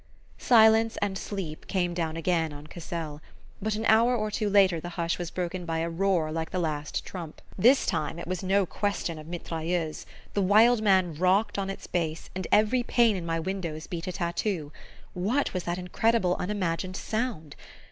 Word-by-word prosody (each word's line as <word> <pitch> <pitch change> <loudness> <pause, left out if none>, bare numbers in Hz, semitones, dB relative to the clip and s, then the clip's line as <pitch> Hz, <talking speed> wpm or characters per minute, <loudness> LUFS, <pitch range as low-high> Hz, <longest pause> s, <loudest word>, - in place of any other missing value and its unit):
Silence 225 -1 +5
and 200 -1 -1
sleep 190 -6 -5
came 175 -3 0
down 165 -2 -2
again 165 -1 0
on 145 0 -10
Cassel; 160 -2 -6 0.4
but 215 +1 -1
an 220 +1 -3
hour 230 +3 +5
or 215 -2 -1
two 210 0 -1
later 195 -4 +4
the 175 - -6
hush 170 0 -1
was 175 -2 -3
broken 180 0 -3
by 165 -1 -2
a 165 +1 -1
roar 170 -3 +1
like 160 0 -3
the - - -3
last 155 -4 -2
trump. 170 -5 -7 0.2
This 250 +8 +5
time 160 -1 -1
it 170 - -6
was 185 -1 -3
no 195 +1 +2
question 180 -4 -2
of 155 - -11
mitrailleuses. 165 -1 -3 0.3
The 200 - +1
Wild 215 +4 +5
Man 190 -5 +3
rocked 185 +6 +2
on 195 0 -2
its 195 - -6
base, 165 -2 -3
and 185 -1 -4
every 215 +4 +4
pane 235 -3 +3
in 175 -3 -5
my 165 0 0
windows 165 -3 -4
beat 170 0 -5
a - - -1
tattoo. 170 -3 -2 0.4
What 215 +11 0
was 185 -2 -3
that 175 +1 -2
incredible 185 +1 +1
unimagined 185 -2 -2
sound? 215 - -3
180 Hz, 185 wpm, -27 LUFS, 165-205 Hz, 0.4 s, Silence